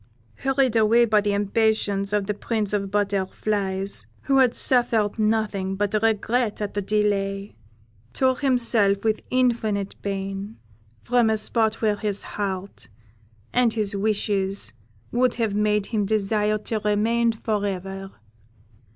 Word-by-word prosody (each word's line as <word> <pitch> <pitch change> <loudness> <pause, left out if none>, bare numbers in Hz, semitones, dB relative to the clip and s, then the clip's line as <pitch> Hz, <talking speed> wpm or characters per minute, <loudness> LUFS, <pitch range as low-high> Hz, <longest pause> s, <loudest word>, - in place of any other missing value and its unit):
Hurried 270 -3 +1
away 225 +2 +5
by 215 -2 +3
the 205 0 0
impatience 205 -1 0
of 210 -1 +1
the 210 - -1
Prince 210 0 -2
of 205 - +2
the 195 - -5
Butterflies, 200 0 -2 0.2
who 270 -1 +3
had 250 -2 +4
suffered 230 -4 +2
nothing 210 -3 0
but 205 +1 -1
regret 225 +1 0
at 210 -1 -3
the 205 - -1
delay, 200 -1 0
he - - -33 0.6
tore 260 - +1
himself, 230 -7 +3
with 220 -1 0
infinite 225 -6 0
pain, 195 +1 -4 0.4
from 240 -2 +2
a 220 - +2
spot 220 +1 +1
where 210 -1 +2
his 205 -1 -3
heart 195 -1 -5 0.7
and 245 -2 +3
his 210 -2 -1
wishes 200 - -1 0.4
would 245 0 +2
have 225 -4 -1
made 210 0 +1
him 210 -2 -1
desire 215 0 +1
to 215 +1 -3
remain 220 +3 +1
for 215 -2 -2
ever. 195 0 -4
210 Hz, 140 wpm, -24 LUFS, 200-225 Hz, 0.7 s, away